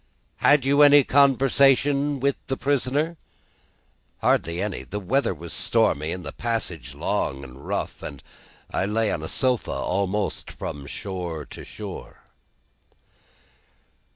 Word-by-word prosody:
Had 145 -2 +4
you 140 +2 +4
any 145 -1 +8
conversation 140 +1 +3
with 140 +1 +1
the 135 - -2
prisoner?" 145 +4 0 1.0
"Hardly 85 +2 +1
any. 105 +1 -2
The 105 - -5
weather 130 +9 +1
was 85 -1 -7
stormy, 75 +3 +1
and 90 0 -5
the - - -4
passage 115 -9 -3
long 70 0 -1
and 65 +1 -11
rough, - - -3
and 70 - -8 0.5
I 95 - 0
lay 110 0 +1
on 75 - -2
a 80 - -4
sofa, 125 - 0
almost 100 +2 -1
from 70 -1 -6
shore 85 -4 -5
to - - -10
shore." - - -9
115 Hz, 125 wpm, -24 LUFS, 85-140 Hz, 1.0 s, any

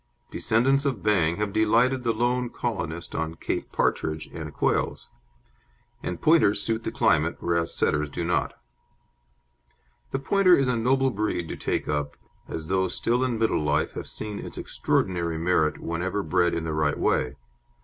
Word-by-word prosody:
Descendants 130 +5 +2
of 130 -9 -1
Bang 90 -6 +2
have 105 0 -2
delighted 115 +4 +3
the 120 -1 +1
lone 120 +2 0
colonist 85 -9 -4
on 80 0 -2
Cape - - -4
partridge 80 0 0
and - - -6
quails, - - -1 0.9
and 90 - -4
Pointers 155 -11 +4
suit 110 +2 -1
the - - -3
climate, - - +2
whereas 85 -1 0
Setters 75 0 +1
do 85 - -4
not. 85 +1 0 1.6
The - - -1
Pointer 185 +6 +4
is 135 - +2
a 125 - +1
noble 130 +3 +2
breed 100 -5 -2
to - - -4
take - - -2
up, 75 -1 -2 0.3
as 80 -1 -5
those 95 +1 0
still 120 +2 +1
in 125 -3 0
middle 110 -7 +1
life 75 0 0
have - - -6
seen 105 -1 -6
its - - -8
extraordinary 85 -3 -1
merit 80 -2 +1
whenever 90 +4 -2
bred 85 +1 +2
in 85 - -2
the 80 -1 -3
right 75 -1 +1
way. 65 - +1
95 Hz, 160 wpm, -26 LUFS, 80-120 Hz, 1.6 s, Pointers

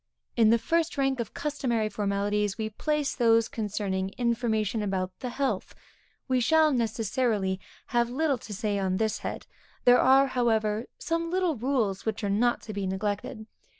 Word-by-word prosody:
_ - - -59 0.3
In 225 -2 +5
the 230 - +5
first 330 +6 0
rank 270 -2 +1
of 235 - -4
customary 255 -7 -1
formalities, 205 0 -1
we 220 -1 -3
place 300 +5 -1
those 230 -2 +3
concerning 200 -3 -2
information 230 -3 0
about 190 -2 -1
the 250 - -4
health. 270 +2 -2 0.5
We 255 -2 +2
shall, 310 +5 +4
necessarily, 220 -4 0 0.3
have 235 0 +2
little 275 0 0
to 215 - -11
say 205 -1 -1
on 190 -1 0
this 220 0 0
head; - - -5 0.4
there 245 0 +7
are, 265 +1 +6
however, 225 -4 0
some 335 0 -2
little 360 -3 +1
rules 230 -6 -1
which 220 -1 -3
are 200 - 0
not 240 +4 +1
to 215 - -7
be 200 -1 -2
neglected. 205 +4 -3
225 Hz, 165 wpm, -27 LUFS, 205-260 Hz, 0.5 s, there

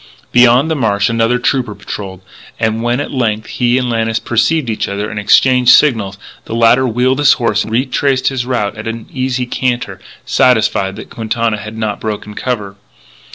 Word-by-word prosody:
Beyond 125 +5 +4
the - - +1
marsh 105 -6 +1
another 115 +1 +1
trooper 125 -3 -1
patrolled; 95 -2 -7 0.4
and 110 0 0
when 120 +2 0
at 145 - -4
length 110 -4 -1
he 120 0 0
and 125 -1 -1
Lannis 115 -1 -1
perceived 120 +6 0
each 110 -2 -2
other 100 +2 -4
and 105 - -4
exchanged 125 +4 +4
signals, 110 -9 +1 0.3
the 115 - -5
latter 120 +3 +4
wheeled 125 +3 +1
his 145 -2 +5
horse 115 -4 0
and - - -8
retraced 130 +2 +1
his 130 -3 -3
route 120 -5 -2
at 105 +1 -7
an 115 0 -5
easy 130 -1 -2
canter, 125 0 -2 0.3
satisfied 110 -5 +2
that - - -10
Quintana 115 0 -2
had 105 +1 -8
not 110 -2 -2
yet - - -25
broken 105 -1 -5
cover. 105 -5 -4
115 Hz, 180 wpm, -14 LUFS, 110-125 Hz, 0.4 s, his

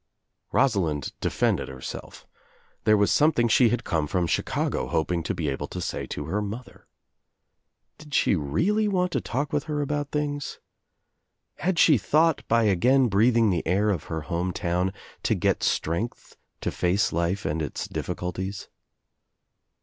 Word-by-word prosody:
Rosalind 85 - +1
defended - - 0
herself. 65 -1 -8 0.6
There 110 0 +5
was 100 0 +3
something 150 -6 +4
she 115 +1 +5
had 120 +1 -1
come 80 -3 0
from 90 +3 0
Chicago 80 - -1
hoping 85 +1 0
to - - -3
be 80 - -2
able 70 -1 -2
to - - -6
say - - -3
to - - -5
her 100 +6 -1
mother. 110 +5 -7 1.1
Did 150 -2 -7
she - - +3
really 170 - +1
want 180 -3 +1
to - - 0
talk 145 +5 -3
with 145 -1 0
her 150 -1 -2
about 145 0 -2
things? 145 -1 -3 1.0
Had 175 +4 0
she 150 -6 +6
thought, 155 +7 +3
by 115 0 +3
again 120 +6 +4
breathing 115 +1 +4
the 85 -3 0
air 100 +5 +2
of 85 -6 -3
her 80 -1 -4
home 90 +3 -2
town, 90 +3 0 0.3
to - - +1
get - - +1
strength 85 +9 -2 0.3
to - - -1
face 90 +4 +1
life 85 +4 -1
and 80 +1 -1
its 75 - -4
difHcuities? 95 +2 -4
105 Hz, 155 wpm, -26 LUFS, 85-145 Hz, 1.1 s, she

